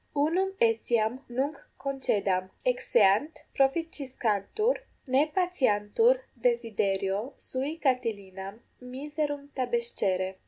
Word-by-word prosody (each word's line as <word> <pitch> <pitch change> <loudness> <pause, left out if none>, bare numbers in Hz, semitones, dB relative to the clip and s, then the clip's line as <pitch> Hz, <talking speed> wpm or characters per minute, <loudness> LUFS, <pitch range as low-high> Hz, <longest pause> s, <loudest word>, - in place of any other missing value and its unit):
Unum 355 +7 +1
etiam 225 +1 +2
nunc 275 +5 -1 0.2
concedam: 200 -9 0 0.2
exeant, 285 - +3 0.2
proficiscantur, 270 - 0 0.3
ne 270 +3 +3
patiantur 360 - +2
desiderio 220 -2 0
sui 275 +5 -3
Catilinam 210 - -2 0.2
miserum 290 +3 -4
tabescere. 205 -7 -1
255 Hz, 75 wpm, -29 LUFS, 210-295 Hz, 0.3 s, exeant